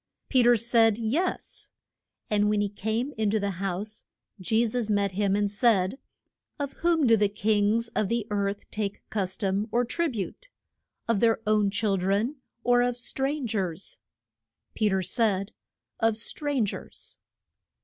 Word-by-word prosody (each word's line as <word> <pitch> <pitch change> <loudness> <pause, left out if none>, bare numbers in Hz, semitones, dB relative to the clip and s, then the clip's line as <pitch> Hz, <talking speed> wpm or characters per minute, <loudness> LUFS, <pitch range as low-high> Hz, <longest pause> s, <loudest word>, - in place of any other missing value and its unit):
Pe 260 - +4
ter 240 0 +6
said, 225 -1 +3
Yes. 265 +12 -1 0.6
And 210 0 +2
when 210 0 +2
he 205 -1 0
came 220 +7 -2
in 215 -2 +2
to 215 +1 +1
the 200 -3 -3
house 195 +3 -3 0.4
Je 220 +5 +2
sus 230 -1 -1
met 200 -2 +1
him 195 +1 +1
and 205 0 +2
said. 205 +1 +2 0.6
Of 280 -2 -4
whom 335 -3 +2
do 230 -2 +6
the 205 -2 +2
kings 210 +2 +1
of 210 -3 -1
the 235 -2 0
earth 200 0 -2
take 205 -2 -3
cus 190 -3 -1
tom 200 +1 0
or 240 +2 +2
trib 320 +2 -1
ute? 220 - -5 0.6
of 230 -3 +2
their 225 0 +3
own 210 -1 +3
chil 205 -1 0
dren 200 +9 0 0.3
or 245 0 +4
of 245 0 0
stran 270 +3 -2
gers? 195 - -3 0.7
Pe 215 -1 +1
ter 190 -1 0
said, 200 0 +1 0.5
Of 225 -1 +2
stran 275 +1 -1
gers. 200 - -7
215 Hz, 160 wpm, -27 LUFS, 200-235 Hz, 0.7 s, ter